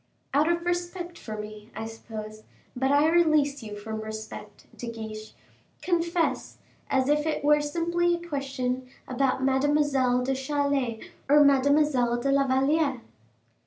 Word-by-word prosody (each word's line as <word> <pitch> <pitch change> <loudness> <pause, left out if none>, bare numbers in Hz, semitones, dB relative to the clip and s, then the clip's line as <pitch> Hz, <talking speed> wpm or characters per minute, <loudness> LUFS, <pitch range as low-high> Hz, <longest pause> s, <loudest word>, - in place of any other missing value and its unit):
"Out 300 +4 +3
of 340 0 -2
respect 350 0 -3
for 215 -1 -7
me, 210 0 -8
I 220 - -4
suppose; 215 -1 -8 0.3
but 265 +2 0
I 290 +2 +4
release 310 -4 +3
you 210 -2 -7
from 220 +1 -6
your 220 - -6
respect, 220 0 -8
De 240 - -7
Guiche. 220 -1 -8 0.5
Confess, 340 -1 0 0.3
as 265 -1 +2
if 295 +1 +2
it 315 - -1
were 295 0 +4
simply 340 +3 0
a 345 0 -9
question 260 -4 -3 0.2
about 260 0 0
Mademoiselle 270 -2 +2
de 270 +1 0
Chalais 270 -3 -1 0.2
or 295 +1 +7
Mademoiselle 280 -3 +3
de 275 +3 0
la 275 0 +3
Valliere." 270 0 +1
275 Hz, 145 wpm, -27 LUFS, 240-300 Hz, 0.5 s, or